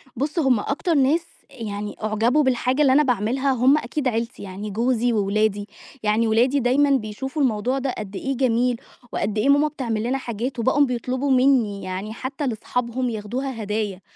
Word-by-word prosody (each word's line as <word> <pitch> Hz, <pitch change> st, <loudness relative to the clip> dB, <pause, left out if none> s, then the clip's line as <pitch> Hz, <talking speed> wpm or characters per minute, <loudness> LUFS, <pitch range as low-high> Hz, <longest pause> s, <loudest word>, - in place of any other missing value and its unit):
بُص، 295 Hz, +7 st, -2 dB
هم 260 Hz, -7 st, +3 dB
أكتر 325 Hz, -, -1 dB
ناس 300 Hz, +4 st, +3 dB, 0.2 s
يعني 210 Hz, -5 st, -6 dB
أعجبوا 225 Hz, +7 st, +2 dB
بالحاجة 260 Hz, +2 st, +1 dB
اللي 265 Hz, -3 st, +5 dB
أنا 300 Hz, +2 st, +5 dB
باعملها 250 Hz, +3 st, +1 dB
هم 260 Hz, +3 st, +4 dB
أكيد 300 Hz, -2 st, -2 dB
عيلتي، 230 Hz, -2 st, -2 dB
يعني 200 Hz, +2 st, -6 dB
جوزي 240 Hz, +3 st, +1 dB
وولادي. 205 Hz, 0 st, 0 dB, 0.4 s
يعني 215 Hz, +2 st, +2 dB
ولادي 245 Hz, +6 st, +3 dB
دايمًا 270 Hz, +4 st, +3 dB
بيشوفوا 265 Hz, +4 st, -1 dB
الموضوع 250 Hz, +1 st, +1 dB
ده 265 Hz, -1 st, -2 dB
قد 205 Hz, -2 st, -7 dB
إيه 270 Hz, +4 st, -3 dB
جميل 245 Hz, -1 st, +1 dB, 0.3 s
وقد 210 Hz, +1 st, -2 dB
إيه 265 Hz, +7 st, +2 dB
ماما 290 Hz, +2 st, +5 dB
بتعمل 235 Hz, -7 st, -3 dB
لنا 255 Hz, +3 st, 0 dB
حاجات، 240 Hz, +1 st, -4 dB
وبقوا 265 Hz, +5 st, +3 dB
بيطلبوا 255 Hz, +2 st, -2 dB
منّي 250 Hz, -6 st, +3 dB
يعني 190 Hz, +4 st, -5 dB
حتّى 265 Hz, +4 st, -4 dB
لأصحابهم 245 Hz, +2 st, -2 dB
ياخدوها 230 Hz, +3 st, -4 dB
هدايا. 205 Hz, -2 st, -3 dB
245 Hz, 165 wpm, -23 LUFS, 215-270 Hz, 0.4 s, اللي